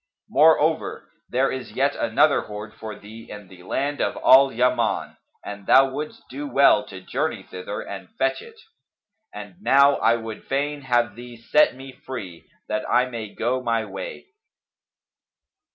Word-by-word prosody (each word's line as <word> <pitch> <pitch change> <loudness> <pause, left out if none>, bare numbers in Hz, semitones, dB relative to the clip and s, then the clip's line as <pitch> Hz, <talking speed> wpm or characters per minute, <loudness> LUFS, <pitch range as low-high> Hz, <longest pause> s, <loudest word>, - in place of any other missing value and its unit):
Moreover, 155 +1 +2 0.2
there 130 +2 +1
is 130 -3 -6
yet 140 +2 +1
another 140 +6 +2
hoard 105 +1 -8
for 110 -1 -8
thee 110 +2 -13
in 105 -3 -10
the 90 -2 -15
land 140 +10 -2
of - - 0
Al 135 +1 +6
Yaman 120 -1 0 0.3
and 100 -1 -8
thou 135 0 +6
wouldst 150 +3 -6
do 145 +3 -6
well 140 -7 +4
to 95 -2 -10
journey - - -3
thither 95 +3 -7
and 95 -2 -8
fetch 135 0 0
it. 460 -1 -14 0.7
And 180 - -10
now 140 -5 +5
I 115 - +3
would 115 -1 -8
fain 145 +2 -2
have 120 -4 +1
thee 120 0 -11
set 125 +5 +3
me 135 +1 -10
free, 105 -11 -9 0.2
that 105 - -2
I 125 +1 +3
may 115 -5 -7
go 125 +3 -1
my 115 -2 -1
way." 95 -2 -8
125 Hz, 155 wpm, -23 LUFS, 105-135 Hz, 0.7 s, Al